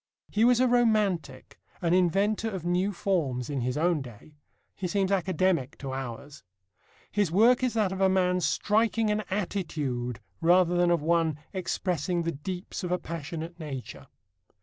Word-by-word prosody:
He 215 - +2
was 245 0 +5
a 255 - +4
romantic, 210 - +1 0.2
an 170 -1 +1
inventor 195 +5 +2
of 190 -5 -6
new 180 +3 +1
forms, 150 -10 -1
in 140 -3 -2
his 125 +3 -1
own 165 -1 +2
day. 125 +3 -12 0.4
He 185 - -4
seems 195 +1 0
academic 185 -6 +1
to 135 -2 -6
ours. 135 +2 -7 0.7
His 205 -5 +1
work 230 +8 +5
is 255 -2 0
that 210 -4 +2
of 190 0 -4
a 190 - +5
man 180 -1 +2
striking 220 +3 +1
an 210 0 0
attitude 150 - -2 0.2
rather 175 +1 +4
than 175 0 +3
of 170 -3 +2
one 165 -2 +2 0.2
expressing 180 -2 -1
the 170 - -1
deeps 180 +6 -6
of 180 - -3
a 180 - +2
passionate 165 +1 -6
nature. 140 -5 -7
180 Hz, 160 wpm, -28 LUFS, 155-200 Hz, 0.7 s, was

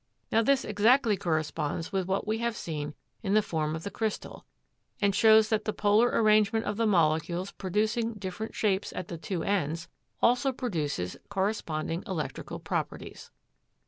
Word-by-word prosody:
Now, 225 - +4
this 270 +3 +2
exactly 215 +2 +4
corresponds 160 -3 -2
with 190 -2 -1
what 190 +1 0
we 215 +1 -1
have 235 -1 -1
seen 150 -2 -4 0.3
of 195 -2 0
the 215 - +6
form 155 -4 -1
of 160 - -6
the 200 - -5
crystal, 220 -2 -4 0.5
and 200 -1 +2
shows 220 +1 +6
that 215 -2 0
the 215 - -1
polar 210 +3 +4
arrangement 215 -1 +3
of 205 - -1
the 230 -1 +2
molecules 170 0 +1
producing 215 +4 -1
different 200 +2 -6
shapes 200 -2 0
at 180 - -5
the 170 - -6
two 175 -1 -3
ends, 165 -5 -1 0.3
also 250 +3 +3
produces 155 - -3
corresponding 190 -5 -2
electrical 170 -6 -4
properties. - - -5
200 Hz, 155 wpm, -29 LUFS, 165-220 Hz, 0.5 s, the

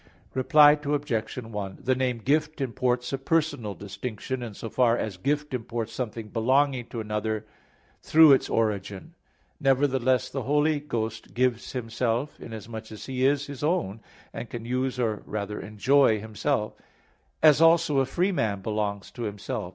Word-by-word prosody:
Reply 145 +3 +6
Obj. 145 -6 -1
1: 105 -5 -5
The 130 - +1
name 130 -1 0
"Gift" 150 +6 0
imports 125 -1 -1
a 135 - -1
personal 135 -8 0
distinction, 115 +5 -5
in 115 -4 -6
so 115 - -6
far 120 0 +2
as 105 -3 -3
gift 145 - -1
imports 115 -2 -4
something 115 -3 -5
belonging 130 +2 +1
to 115 - -5
another 110 0 -2 0.6
through 160 -1 +7
its 135 - +2
origin. 105 - -2 0.5
Nevertheless, 135 -3 +2
the 135 - -3
Holy 150 +4 +2
Ghost 115 -6 -4
gives 125 -1 0
Himself, 120 +2 -2
inasmuch 110 0 -8
as 110 - -8
He 130 -1 -2
is 140 +1 +3
His 140 -1 -8
own, 150 - 0 0.3
and 120 - -6
can 115 -1 -6
use 125 +1 -1
or 110 -4 0
rather 105 0 -4
enjoy 110 +3 +3
Himself; 110 +2 -2 0.7
as 155 -1 +7
also 165 -3 +5
a 135 - +3
free 180 +7 +1
man 105 - -1
belongs 105 -2 -2
to 120 - -9
himself. 100 -2 -4
125 Hz, 150 wpm, -26 LUFS, 110-140 Hz, 0.7 s, through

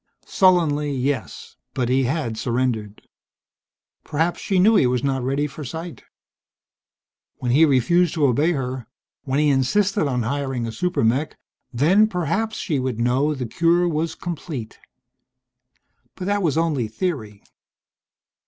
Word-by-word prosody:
Sullenly, 160 -6 +2
yes, 130 - -3 0.2
but 125 -2 0
he 130 +1 +2
had 130 -4 -2
surrendered. 115 -3 -2 1.0
Perhaps 165 +4 -1
she 195 - -1
knew 210 +5 +5
he 135 - +4
was 125 -1 0
not 135 -2 0
ready 135 +4 0
for 150 +1 -7
sight. 160 +5 -7 1.3
When 125 - -2
he 150 +6 +6
refused 160 +6 +2
to 155 -3 +2
obey 145 +7 +2
her, 130 -4 -4 0.4
when 135 0 -1
he 150 0 +3
insisted 170 - +1
on 125 -3 -1
hiring 135 -1 -2
a 115 - -4
super 180 +5 -1
mech 130 +7 0 0.3
then, 170 - +4
perhaps, 210 +4 -2
she 150 -7 -1
would 130 -3 -3
know 130 +6 +1
the 130 -2 -4
cure 170 +8 +2
was 160 0 -2
complete. 155 -9 -6 1.4
But 185 - -6
that 205 +1 0
was 160 -4 0
only 155 -8 0
theory. 110 - -4
145 Hz, 140 wpm, -22 LUFS, 125-170 Hz, 1.4 s, he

